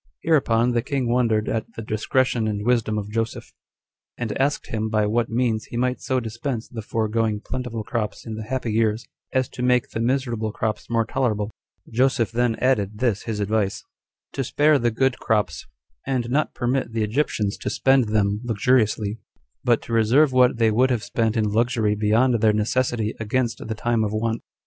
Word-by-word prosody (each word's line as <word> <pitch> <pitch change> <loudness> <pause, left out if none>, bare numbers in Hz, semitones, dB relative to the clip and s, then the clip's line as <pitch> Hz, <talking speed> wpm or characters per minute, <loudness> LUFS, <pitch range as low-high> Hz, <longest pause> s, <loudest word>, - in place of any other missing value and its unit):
7. - - -4
Hereupon 120 -5 +3
the 120 -1 +1
king 135 -1 -2
wondered 115 -3 +1
at 115 0 -3
the 115 - -6
discretion 110 +2 0
and 105 -1 -2
wisdom 115 -3 +1
of 105 0 -4
Joseph; 115 +1 -3 0.6
and 120 -3 -3
asked 145 +2 -1
him 110 0 -1
by 110 -1 +2
what 115 +2 0
means 115 -2 0
he 120 - -7
might 125 +1 0
so 130 -1 0
dispense 120 +1 -4
the 115 - -7
foregoing 110 0 -1
plentiful 115 -2 -4
crops 110 -2 -3
in 110 - -5
the 110 - -5
happy 125 -1 -2
years, 110 0 +1 0.3
as 130 -1 +1
to - - -8
make 125 -1 +2
the - - -4
miserable 120 -3 0
crops 110 0 -3
more 115 -1 +1
tolerable. 110 -4 -1 0.4
Joseph 125 -2 +1
then 120 0 +1
added 105 -6 0
this 115 -4 0
his 110 -2 -3
advice: 100 -1 0 0.5
To 135 - -1
spare 145 +3 +3
the 120 -1 +2
good 125 +2 0
crops, 105 -2 -1 0.4
and 125 -3 -1
not 150 +3 0
permit 125 -1 -1
the 110 -1 0
Egyptians 105 -3 0
to - - -3
spend 135 -2 +3
them 105 -1 0
luxuriously, 110 -2 +1 0.4
but 120 -2 +2
to 115 - -6
reserve 120 +6 +4
what 125 -1 +4
they 115 -1 +3
would 125 +4 +3
have 120 -4 0
spent 115 0 0
in 110 - +2
luxury 115 -1 +1
beyond 110 +3 +2
their 110 -1 +4
necessity 110 0 0
against 115 +2 -1
the 110 - -3
time 115 0 0
of 105 - -1
want. 115 +1 -1
115 Hz, 185 wpm, -23 LUFS, 110-125 Hz, 0.6 s, reserve